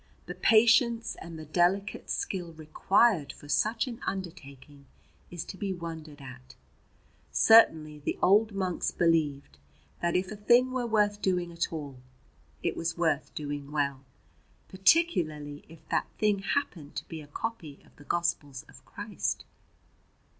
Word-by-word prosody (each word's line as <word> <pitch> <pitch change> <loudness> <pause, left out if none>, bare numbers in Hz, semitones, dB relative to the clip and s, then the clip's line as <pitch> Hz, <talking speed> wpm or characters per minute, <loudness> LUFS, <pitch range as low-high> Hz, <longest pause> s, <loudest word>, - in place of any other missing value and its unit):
The - - -6
patience 230 +1 +4
and 165 0 -8
the 155 - -8
delicate 180 +6 0
skill 175 -4 -3
required 160 +3 +2
for 145 - -14
such 215 +10 +1
an 240 -2 -7
undertaking 145 -7 -7 0.4
is 175 -2 -5
to 190 - -9
be 195 0 -2
wondered 160 -4 -8
at. 130 -2 -12 0.8
Certainly 160 -9 +5
the 145 - -3
old 215 +3 +4
monks 190 -3 -1
believed 150 - 0 0.4
that 170 0 0
if 185 +2 0
a - - -5
thing 240 +5 +4
were 255 -2 -2
worth 210 -2 +1
doing 180 -2 0
at 170 - -2
all 145 -5 -6 0.6
it - - -1
was 165 0 -3
worth 160 -4 0
doing 145 -1 -5
well, 140 -2 -1 0.7
particularly 170 - +1
if 165 0 -16
that - - 0
thing 210 -2 +2
happened 185 - -3
to - - -5
be 160 -1 -7
a 145 - -13
copy 160 -3 -6
of - - -24
the 145 - -14
Gospels 145 -5 -2
of - - -16
Christ. - - -4
170 Hz, 145 wpm, -29 LUFS, 150-205 Hz, 0.8 s, Certainly